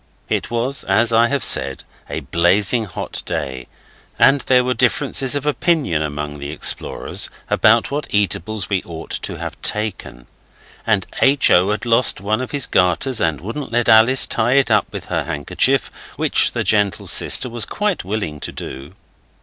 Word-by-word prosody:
It - - -2
was, 120 +4 -1
as 115 +1 +2
I 115 +1 +4
have 140 +1 -1
said, - - +2 0.3
a - - -4
blazing 100 +7 +1
hot 90 - -6
day, 65 -2 -5 0.5
and 135 0 +4
there 125 -1 +4
were 125 0 0
differences 130 +2 0
of 145 0 -3
opinion 150 - 0
among 75 -1 -5
the 70 0 -6
explorers 75 - -1 0.2
about 115 +3 +3
what 145 +1 -3
eatables 105 0 -2
we 95 -3 -1
ought 80 -1 -10
to - - -3
have - - -8
taken, 105 - -3 0.6
and 105 -4 +1 0.2
H. 135 0 +4
O. 90 +3 +4
had 105 +3 -2
lost 115 -1 +3
one 105 +5 -2
of 130 - -5
his 140 -3 0
garters 95 +7 0
and 80 -4 -1
wouldn't 115 - -6
let 120 -1 0
Alice 115 +4 +6
tie 120 +2 0
it 135 -4 +2
up 105 -2 +2
with 100 -1 -7
her 85 -4 -3
handkerchief, 75 -4 0 0.2
which - - +2
the - - -2
gentle 105 -2 0
sister - - +2
was 120 -2 0
quite 210 -3 -2
willing 95 -6 -4
to - - -6
do. 70 +7 -9
110 Hz, 170 wpm, -18 LUFS, 90-125 Hz, 0.6 s, Alice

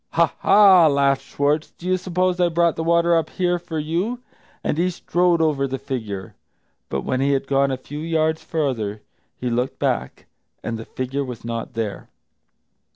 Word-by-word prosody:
"Ha, 165 -1 +3
ha," 195 -5 +7
laughed 140 -2 +2
Schwartz, 145 +2 0
"do 175 - -12
you 185 0 +2
suppose 185 0 0
I 175 -1 +3
brought 170 0 +2
the 165 - -3
water 170 +1 +3
up 165 -2 +1
here 175 -1 0
for 170 -2 -6
you?" 175 +11 -1 0.4
And 150 - -1
he 180 +1 +2
strode 175 -1 +1
over 140 -3 +1
the 135 0 -3
figure. 105 -8 -5 0.6
But 70 - -2
when 130 0 -1
he 140 +1 +2
had 135 - 0
gone 140 0 +2
a 130 - -1
few 145 +3 -8
yards 160 0 0
farther, 115 -10 -2 0.3
he 125 -1 -3
looked 125 +3 -1
back, - - -2 0.4
and 115 0 -3
the 115 - -7
figure 130 +2 -3
was 125 -4 -8
not 115 0 -4
there. 110 -3 -4
150 Hz, 180 wpm, -22 LUFS, 130-170 Hz, 0.6 s, ha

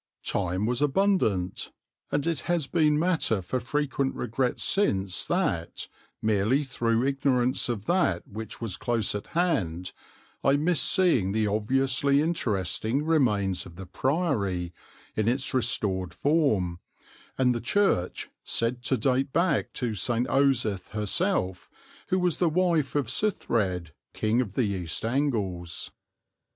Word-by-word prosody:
Time 95 +1 0
was 125 +3 -1
abundant, 145 - +1 0.4
and 145 - 0
it 165 -4 0
has 170 -4 +1
been 150 -1 +2
matter 160 - +1
for 95 +8 -2
frequent 140 +1 -1
regret 125 +2 -1
since 95 - +1
that, 125 - -1 0.4
merely 110 +6 +2
through 120 -3 0
ignorance 130 -3 +1
of 110 -4 -3
that 175 - +1
which 110 +2 -7
was 115 -5 -3
close 115 -3 0
at 105 - -5
hand, 90 - 0 0.5
I 135 - +4
missed 160 +2 +3
seeing 130 - +3
the 110 0 +1
obviously 135 +6 +2
interesting 125 - 0
remains 105 - +1
of 85 - -13
the 95 +2 -8
Priory, 100 - -1 0.4
in 110 0 0
its 130 +3 0
restored 95 -7 0
form, 110 - +1 0.6
and 125 -1 +3
the 120 - -3
church, 130 - +1 0.2
said 120 +2 -1
to 130 - +2
date 130 +3 +1
back 165 -2 +1
to 120 -3 -2
St. 120 +4 0
Osyth 125 -8 +2
herself, 105 - -1 0.4
who 185 - +1
was 180 -3 +1
the 175 - +2
wife 165 -4 +1
of 145 -2 +2
Suthred, 105 - 0 0.2
King 110 +3 +1
of 105 -6 -5
the 130 - +2
East 95 -2 -3
Angles. 105 - -1
120 Hz, 135 wpm, -27 LUFS, 100-145 Hz, 0.6 s, I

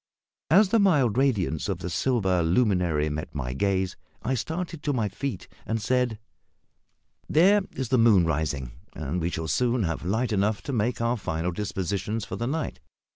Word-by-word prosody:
As 190 +4 +6
the 230 - +3
mild 145 - +3
radiance 105 - +1
of 95 - -1
the 90 0 -6
silver 95 - +1
luminary 85 -4 +2
met 75 +1 -5
my 65 -3 -3
gaze 95 +5 0 0.3
I 130 - 0
started 160 +5 -3
to 145 -1 -1
my 115 -5 0
feet, 120 0 -5 0.2
and 115 +2 -2
said 125 0 0 1.1
"There 195 +7 +5
is 130 -4 -4
the 130 - +3
moon 105 -7 +5
rising, 75 -5 -1 0.2
and 80 +4 -3
we 85 - 0
shall 80 -2 -4
soon 120 +3 +1
have 80 -3 -2
light 110 +7 0
enough 100 0 +1
to 140 - -4
make 115 +1 0
our 120 +1 +1
final 85 -3 -2
dispositions 100 +3 -3
for - - -5
the 120 - -3
night. 155 +3 -3
105 Hz, 175 wpm, -26 LUFS, 85-125 Hz, 1.1 s, As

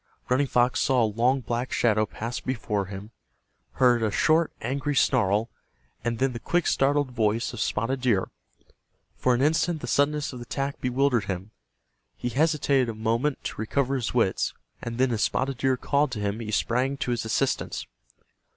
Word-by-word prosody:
Running 135 +3 +2
Fox 125 0 +2
saw 130 -4 +3
a - - +4
long 120 +5 +1
black 120 +1 -3
shadow 110 -2 +2
pass 115 +4 -5
before 105 -6 -2
him, 100 +2 -8 0.6
heard 125 -2 +4
a 110 - +2
short 155 +9 +2
angry 140 +4 -2
snarl, 115 -4 +2 0.5
and 120 -1 -1
then 130 +1 +1
the 120 - -5
quick 175 +7 0
startled 140 0 +2
voice 115 0 0
of 120 - -7
Spotted 115 +5 -1
Deer. 115 -7 +1 0.8
For 125 -1 +2
an 125 - +1
instant 160 +2 +2
the - - -6
suddenness 145 0 +1
of 125 - -7
the - - -6
attack 140 +3 -3
bewildered 125 -3 +1
him. 95 +2 -5 0.7
He 120 - -3
hesitated 140 -2 +2
a 115 - -4
moment 115 +6 -1
to - - -4
recover 135 +4 0
his 125 -4 -2
wits, 115 -6 +1 0.3
and 115 0 -5
then 130 0 +2
as 110 -2 -1
Spotted 135 -1 0
Deer 130 -1 +2
called 145 +3 +1
to 110 - -4
him 100 +1 -2
he 110 -2 -5
sprang 125 +5 0
to 125 - -2
his 120 -1 -1
assistance. 120 +4 -1
125 Hz, 180 wpm, -26 LUFS, 110-135 Hz, 0.8 s, a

